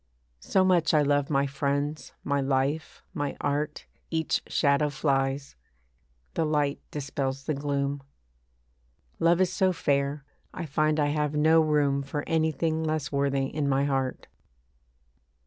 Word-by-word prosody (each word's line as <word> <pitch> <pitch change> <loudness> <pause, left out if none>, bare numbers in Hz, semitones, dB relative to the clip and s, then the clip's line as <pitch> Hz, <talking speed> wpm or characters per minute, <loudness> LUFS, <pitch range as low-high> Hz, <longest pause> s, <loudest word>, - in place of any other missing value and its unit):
So 185 - +2
much 170 -4 +3
I 150 - +5
love 145 -1 +1
my 140 -2 +2
friends, 140 +2 -2
my 140 0 0
life, 135 +3 -1
my 145 -5 -3
art, 145 +1 -2 0.2
Each 160 -1 0
shadow 140 0 +2
flies; 135 -1 -1 0.8
the 165 - 0
light 150 -2 0
dispels 135 -2 -3
the 155 - -1
gloom. 140 0 -2 1.2
Love 170 +1 +4
is 185 -1 +2
so 190 0 +3
fair, 140 -3 0 0.3
I 175 - -4
find 155 +1 +1
I 145 -1 +2
have 150 0 -1
no 160 +2 +5
room 145 -3 +2
For 140 +2 -4
anything 160 0 0
less 155 -3 -2
worthy 140 -1 +1
in 145 +1 -2
my 135 +1 +2
heart. 135 -2 -1
145 Hz, 135 wpm, -27 LUFS, 140-155 Hz, 1.2 s, I